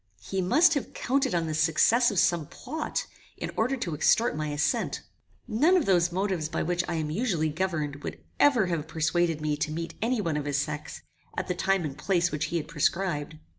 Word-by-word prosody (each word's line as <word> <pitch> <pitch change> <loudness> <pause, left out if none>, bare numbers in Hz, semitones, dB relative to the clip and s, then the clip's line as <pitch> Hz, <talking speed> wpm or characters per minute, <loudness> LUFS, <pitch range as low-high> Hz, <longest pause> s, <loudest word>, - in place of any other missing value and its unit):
He 190 - -2
must 310 - +5
have 285 - -3
counted 265 -3 0
on 170 -1 +1
the 155 - -3
success 165 +10 +4
of 205 - -4
some 170 -4 +2
plot, 315 0 -4 0.3
in - - -4
order 250 +5 +1
to 175 -9 -3
extort 225 +9 +3
my 155 0 -2
assent. 145 0 -1 0.4
None 290 +12 +4
of 345 - +1
those 175 -2 +3
motives 185 -4 -1
by 160 - -1
which 175 +1 0
I 170 - -1
am 155 -2 -2
usually 175 -5 0
governed 155 -3 -2
would 115 - -7 0.2
ever 250 -8 +5
have 165 -4 -2
persuaded 160 0 0
me 150 -1 0
to 150 +1 -2
meet 165 +2 -4
any 240 +2 +1
one 165 -7 -1
of 145 - -3
his 145 -1 0
sex, 150 +1 -4 0.3
at - - -2
the 180 - 0
time 190 -1 +1
and 140 -3 -5
place 175 +3 +1
which 155 +1 -1
he 170 +2 -2
had 155 -2 -4
prescribed. 155 -1 -1
170 Hz, 210 wpm, -27 LUFS, 155-200 Hz, 0.4 s, must